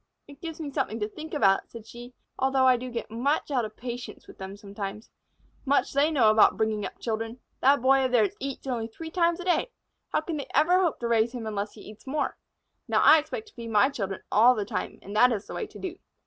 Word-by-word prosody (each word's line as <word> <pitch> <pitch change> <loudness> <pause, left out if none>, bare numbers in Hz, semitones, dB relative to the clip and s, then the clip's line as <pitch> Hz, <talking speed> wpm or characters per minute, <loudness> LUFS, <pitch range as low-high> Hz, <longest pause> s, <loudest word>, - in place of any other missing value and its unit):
"It 285 -1 -14
gives 330 -1 -6
me 295 -3 -5
something 260 -5 -2
to 210 - -1
think 310 +8 -9
about," 195 -10 +2
said 230 -2 -10
she, 240 +2 -11 0.2
"although 265 0 +3
I 255 -1 +6
do 250 +1 -5
get 235 -2 -5
much 275 +6 0
out 250 -5 +1
of 215 0 -10
patience 245 0 -7
with - - -15
them 190 +1 -7
sometimes. 200 +1 -7 0.5
Much 280 0 +1
they 285 +3 +3
know 250 -9 +4
about 215 0 +5
bringing 220 -1 0
up - - -6
children! 225 +1 -4 0.2
That 275 -1 +4
Boy 270 0 +5
of 255 - -1
theirs 220 -5 +3
eats 275 0 -5
only 240 -4 -2
three 320 +8 -9
times 340 -1 +2
a 360 - -6
day. 370 +7 +1 0.4
How - - +1
can 315 0 -4
they 285 - -5
ever 335 +6 +5
hope 345 -4 0
to 235 - -1
raise 230 +1 +2
him 240 -3 -5
unless 210 -1 -3
he - - -13
eats 215 +4 -13
more? 290 +2 -1 0.5
Now, - - +2
I 315 - +8
expect 430 +9 -6
to - - -26
feed 230 -2 -8
my 210 +3 +4
children 195 -8 -4
all 240 +4 +6
the 210 -3 -2
time, - - -4
and 200 +2 -8
that 250 +3 +6
is 210 -4 -2
the - - -9
way - - -3
to - - -13
do." 365 0 -6
245 Hz, 245 wpm, -27 LUFS, 220-285 Hz, 0.5 s, I